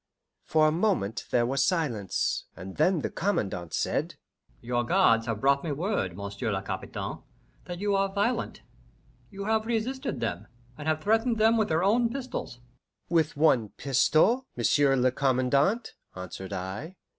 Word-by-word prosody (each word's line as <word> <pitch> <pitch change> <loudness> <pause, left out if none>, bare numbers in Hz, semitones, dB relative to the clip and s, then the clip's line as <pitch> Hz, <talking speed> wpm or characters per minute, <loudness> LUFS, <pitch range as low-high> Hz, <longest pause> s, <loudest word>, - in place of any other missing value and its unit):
For 155 -1 +3
a - - +3
moment 165 - 0
there 120 -1 +2
was 135 +2 +1
silence, 135 - 0
and 95 +2 -9
then 165 +1 +3
the - - -3
Commandant 100 - -2
said, - - -1 0.4
"Your 120 0 -1
guards 120 -8 +3
have 110 -2 -2
brought 140 +1 +3
me 165 - -2
word, 145 - -2
Monsieur 100 +3 -4
le 95 -1 -2
Capitaine, - - -5 0.5
that 175 -1 -6
you 205 0 +1
are 195 0 +1
violent. 225 +4 -1 0.7
You 200 -1 -7
have 220 0 +1
resisted 240 +3 -2
them, 90 +5 -3 0.3
and 150 +2 -7
have 155 -1 0
threatened 225 +2 +2
them 220 +1 +4
with 220 -2 +2
their 160 +2 +1
own 230 +4 +3
pistols." 255 - -5 0.5
"With 160 -3 +1
one 130 -8 +3
pistol, 155 - +3
monsieur 135 +3 +3
le 130 -1 +3
commandant," 140 - +1 0.2
answered 95 +1 -7
I. 95 - -5
155 Hz, 155 wpm, -28 LUFS, -, 0.7 s, them